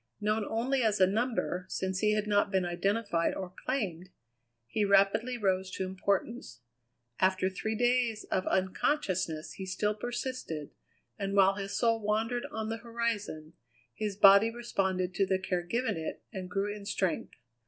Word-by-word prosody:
Known 215 0 0
only 255 +4 +1
as 215 -3 +2
a 185 - +7
number, 200 -3 -1
since 190 0 -2
he 210 0 +3
had 210 0 0
not 205 -1 +2
been 190 -2 +1
identified 180 0 0
or 185 -1 -6
claimed, 185 -9 -2 0.6
he 210 - -1
rapidly 205 +5 +3
rose 190 -3 0
to 190 - -2
importance. 190 - -2 0.6
After 190 0 +2
three 220 +4 -3
days 240 -2 +1
of 185 - 0
unconsciousness 185 - 0
he 190 - -7
still 210 +3 0
persisted, 240 - -4 0.5
and 195 0 -2
while 195 0 +6
his 195 0 -4
soul 230 -1 +2
wandered 225 +3 0
on 220 0 -4
the 225 - -2
horizon, 230 -9 -3 0.4
his 210 - -3
body 200 +2 +7
responded 190 -6 -1
to 195 +1 +1
the 190 - +2
care 185 -1 -1
given 230 +5 -1
it 160 - -5
and 185 -2 -5
grew 200 +2 -1
in 200 -1 -9
strength. 185 -5 -1
200 Hz, 155 wpm, -30 LUFS, 185-225 Hz, 0.6 s, a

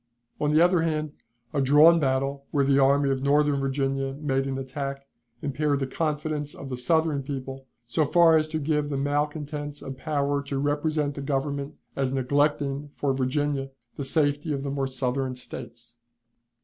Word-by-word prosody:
On 150 0 +1
the 155 +2 +5
other 175 -1 +4
hand, 155 -2 -1 0.4
a 145 - +1
drawn 150 +5 +7
battle, 135 0 -1
where 140 -2 +2
the 140 0 +4
Army 140 +1 +4
of 135 -1 -1
Northern 145 0 +3
Virginia 135 0 -1
made 135 -2 -1
an 135 -1 -2
attack, 135 +1 -5 0.4
impaired 145 0 0
the 135 - 0
confidence 150 0 -2
of 135 - -8
the 130 - -3
Southern 150 +3 +1
people 135 -1 -6 0.2
so 155 +7 +1
far 165 +2 +5
as 155 -1 +3
to 160 0 -3
give 150 -1 0
the 140 - -2
malcontents 145 +1 -2
a 135 - -7
power 140 +1 -1
to 140 -1 -4
represent 145 +1 0
the 140 - -6
Government 140 +1 -2 0.2
as 135 -1 0
neglecting 140 +1 0
for 140 -2 0
Virginia 135 +1 -1 0.3
the 140 - -4
safety 145 +2 +1
of 135 -1 -3
the 140 - -3
more 135 -1 -1
southern 130 0 -2
States. 120 -1 -9
140 Hz, 170 wpm, -26 LUFS, 135-150 Hz, 0.4 s, drawn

